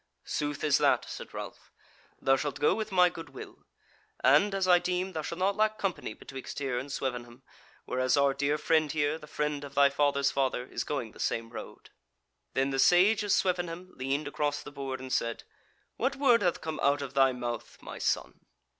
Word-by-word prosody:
"Sooth 145 Hz, -1 st, -3 dB
is 150 Hz, -2 st, +4 dB
that," -, -, +3 dB
said -, -, -8 dB
Ralph, -, -, -8 dB, 0.5 s
"thou 135 Hz, -, +3 dB
shalt 145 Hz, +1 st, -3 dB
go 145 Hz, -, +4 dB
with 220 Hz, -1 st, -3 dB
my 180 Hz, -1 st, +6 dB
good 165 Hz, -3 st, -7 dB
will; 135 Hz, -, -11 dB, 0.6 s
and, 155 Hz, +10 st, +5 dB
as 190 Hz, -1 st, 0 dB
I 180 Hz, -1 st, +6 dB
deem, 180 Hz, +1 st, -1 dB
thou 160 Hz, -, -2 dB
shalt 170 Hz, +2 st, -5 dB
not 195 Hz, +2 st, +1 dB
lack 215 Hz, +1 st, +1 dB
company 195 Hz, -4 st, -3 dB
betwixt 135 Hz, -1 st, -9 dB
here 135 Hz, -3 st, -1 dB
and 135 Hz, +3 st, -7 dB
Swevenham, 125 Hz, -2 st, -4 dB, 0.4 s
whereas 130 Hz, +2 st, +1 dB
our 140 Hz, -1 st, +4 dB
dear 140 Hz, +2 st, 0 dB
friend 155 Hz, -1 st, +2 dB
here, 150 Hz, 0 st, 0 dB
the 150 Hz, -, -12 dB
friend 150 Hz, -1 st, -2 dB
of 140 Hz, 0 st, -9 dB
thy 140 Hz, 0 st, +5 dB
father's 140 Hz, -1 st, +2 dB
father, 130 Hz, -2 st, 0 dB
is -, -, -4 dB
going 125 Hz, -7 st, -3 dB
the -, -, -17 dB
same 115 Hz, 0 st, -2 dB
road." -, -, -10 dB, 0.6 s
Then 135 Hz, +1 st, +1 dB
the 135 Hz, -, -1 dB
Sage 190 Hz, +9 st, +5 dB
of 205 Hz, -1 st, -1 dB
Swevenham 180 Hz, -2 st, 0 dB
leaned 140 Hz, +3 st, -2 dB
across 145 Hz, 0 st, -2 dB
the -, -, -9 dB
board, 135 Hz, -2 st, -5 dB
and 130 Hz, -1 st, -5 dB
said: 115 Hz, -2 st, -1 dB, 0.5 s
"What 260 Hz, +3 st, 0 dB
word 255 Hz, -5 st, +4 dB
hath 175 Hz, -3 st, +1 dB
come 160 Hz, -1 st, -4 dB
out 140 Hz, +1 st, +2 dB
of 140 Hz, -1 st, -7 dB
thy 135 Hz, -1 st, +5 dB
mouth, 120 Hz, -2 st, -5 dB
my -, -, -9 dB
son?" -, -, -1 dB
145 Hz, 200 wpm, -29 LUFS, 135-175 Hz, 0.6 s, my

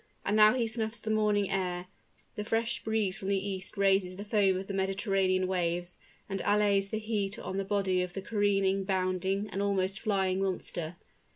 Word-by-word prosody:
And 205 Hz, -, +1 dB
now 215 Hz, +2 st, +7 dB
he 245 Hz, -3 st, +1 dB
snuffs 220 Hz, 0 st, -3 dB
the 220 Hz, 0 st, -3 dB
morning 210 Hz, -2 st, +2 dB
air: 180 Hz, -2 st, -1 dB, 0.5 s
the 210 Hz, -, -4 dB
fresh 225 Hz, +2 st, -1 dB
breeze 215 Hz, -3 st, 0 dB
from 190 Hz, -, -5 dB
the 200 Hz, 0 st, +2 dB
east 195 Hz, +1 st, -4 dB
raises 195 Hz, -2 st, +2 dB
the 200 Hz, +2 st, -7 dB
foam 205 Hz, -3 st, +3 dB
of 190 Hz, -, -4 dB
the 200 Hz, -, -5 dB
Mediterranean 195 Hz, -1 st, +1 dB
waves, 175 Hz, -1 st, -2 dB, 0.3 s
and 195 Hz, -1 st, -3 dB
allays 205 Hz, -1 st, +3 dB
the 220 Hz, -, -2 dB
heat 210 Hz, -2 st, -2 dB
on 190 Hz, -, -5 dB
the 195 Hz, -, 0 dB
body 195 Hz, -2 st, +1 dB
of 180 Hz, -1 st, -4 dB
the 195 Hz, -, -4 dB
careening, 195 Hz, -2 st, +1 dB
bounding, 190 Hz, +1 st, 0 dB
and 195 Hz, -, -2 dB
almost 195 Hz, -1 st, 0 dB
flying 195 Hz, -3 st, 0 dB
monster. 180 Hz, -3 st, -3 dB
195 Hz, 185 wpm, -30 LUFS, 190-210 Hz, 0.5 s, now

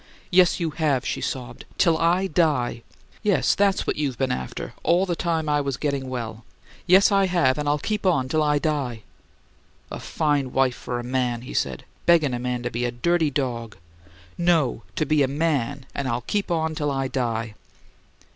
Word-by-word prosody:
"Yes, 180 Hz, -1 st, +5 dB
you 165 Hz, -2 st, -1 dB
have!" 145 Hz, -5 st, 0 dB
she -, -, -2 dB
sobbed. 125 Hz, -2 st, -5 dB
"Till 170 Hz, -3 st, +4 dB
I 175 Hz, +4 st, +2 dB
die." 145 Hz, -11 st, +1 dB, 0.4 s
"Yes; 205 Hz, -4 st, +2 dB
that's 200 Hz, -1 st, +2 dB
what -, -, -1 dB
you 145 Hz, -2 st, 0 dB
been 130 Hz, +1 st, -1 dB
after 65 Hz, -, -5 dB
all 175 Hz, +3 st, +3 dB
the 175 Hz, -2 st, -1 dB
time 165 Hz, -3 st, -1 dB
I 145 Hz, -1 st, +2 dB
was 140 Hz, -2 st, -2 dB
getting 140 Hz, -2 st, -2 dB
well." 115 Hz, -3 st, -5 dB, 0.4 s
"Yes, 190 Hz, +3 st, +6 dB
I 195 Hz, -1 st, +4 dB
have, 150 Hz, -7 st, +2 dB
and 150 Hz, -1 st, -1 dB
I'll 145 Hz, -, +2 dB
keep 210 Hz, +7 st, -3 dB
on 165 Hz, -9 st, +2 dB
till 155 Hz, +4 st, +1 dB
I 150 Hz, -1 st, +2 dB
die!" 140 Hz, -7 st, -2 dB, 0.9 s
"A -, -, -5 dB
fine 145 Hz, -4 st, -1 dB
wife 135 Hz, -1 st, +3 dB
for 120 Hz, -1 st, -4 dB
a -, -, -5 dB
man," 125 Hz, -1 st, -1 dB
he 125 Hz, -, -9 dB
said. 65 Hz, -3 st, -2 dB, 0.2 s
"Beggin' 160 Hz, -6 st, +4 dB
a 120 Hz, -, -2 dB
man 125 Hz, 0 st, -2 dB
to 120 Hz, -, -3 dB
be 120 Hz, +1 st, -2 dB
a 120 Hz, -, +1 dB
dirty 160 Hz, +7 st, +1 dB
dog!" 120 Hz, -5 st, -3 dB, 0.6 s
"No! 165 Hz, -9 st, +2 dB
To 155 Hz, -, 0 dB
be 150 Hz, 0 st, +2 dB
a 135 Hz, -, +4 dB
MAN 140 Hz, -3 st, -1 dB
and 140 Hz, -2 st, -3 dB
I'll 120 Hz, -1 st, -1 dB
keep 205 Hz, -, -2 dB
on 160 Hz, -2 st, 0 dB
till 150 Hz, -1 st, -1 dB
I 135 Hz, -1 st, -1 dB
die!" 115 Hz, -4 st, -2 dB
145 Hz, 195 wpm, -24 LUFS, 125-165 Hz, 0.9 s, Yes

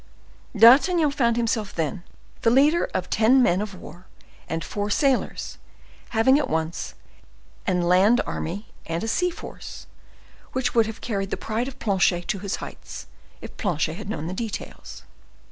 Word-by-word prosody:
D'Artagnan 290 Hz, -, +6 dB
found 235 Hz, -5 st, +1 dB
himself, 220 Hz, -3 st, -1 dB
then, 165 Hz, +2 st, -2 dB, 0.4 s
the 230 Hz, -, +4 dB
leader 290 Hz, +7 st, +4 dB
of 185 Hz, -1 st, -2 dB
ten 245 Hz, +4 st, +5 dB
men 180 Hz, -2 st, +2 dB
of 210 Hz, -2 st, -5 dB
war 180 Hz, 0 st, -12 dB, 0.4 s
and 165 Hz, 0 st, -2 dB
four 205 Hz, +7 st, -3 dB
sailors, 270 Hz, +4 st, 0 dB, 0.5 s
having 250 Hz, +5 st, +4 dB
at 275 Hz, -4 st, -2 dB
once 160 Hz, +1 st, -3 dB, 0.7 s
an 180 Hz, -2 st, +1 dB
land 190 Hz, +7 st, +4 dB
army 195 Hz, +7 st, -5 dB, 0.2 s
and 165 Hz, +4 st, -2 dB
a -, -, -2 dB
sea 360 Hz, +11 st, +1 dB
force, 340 Hz, -, -9 dB, 0.7 s
which 260 Hz, -1 st, 0 dB
would 230 Hz, -2 st, +4 dB
have 225 Hz, 0 st, -7 dB
carried 195 Hz, -4 st, -2 dB
the -, -, -2 dB
pride 225 Hz, +3 st, -2 dB
of 270 Hz, -1 st, -8 dB
Planchet 190 Hz, -6 st, +1 dB
to 195 Hz, -, 0 dB
its 200 Hz, -, -1 dB
height, -, -, -9 dB, 0.4 s
if -, -, -10 dB
Planchet 160 Hz, -5 st, -1 dB
had 200 Hz, +4 st, -8 dB
known 160 Hz, -6 st, -4 dB
the 175 Hz, -, -4 dB
details. 220 Hz, +2 st, -6 dB
215 Hz, 160 wpm, -24 LUFS, 180-245 Hz, 0.7 s, D'Artagnan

